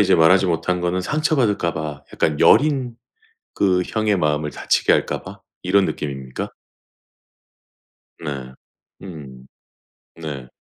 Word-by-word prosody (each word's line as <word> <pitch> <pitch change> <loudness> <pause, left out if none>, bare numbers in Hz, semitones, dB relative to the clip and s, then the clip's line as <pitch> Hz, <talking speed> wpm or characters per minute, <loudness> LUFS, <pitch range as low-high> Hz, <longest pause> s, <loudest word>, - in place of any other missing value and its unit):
이제 100 - +4
말하지 90 +3 +5
못한 90 +1 0
거는 90 +1 0
상처받을까 120 - +1
봐 75 -2 -5
약간 75 -2 0
여린 135 -5 +4 0.6
그 90 -2 +2
형의 110 -3 0
마음을 75 -2 0
다치게 - - +1
할까 - - 0
봐 - - -10 0.2
이런 95 +1 +3
느낌입니까? 65 -3 -5 1.7
네. 70 -5 -6 0.5
음. 70 -8 -10 0.7
네. 75 -6 -7
85 Hz, 230 characters per minute, -21 LUFS, 75-100 Hz, 1.7 s, 말하지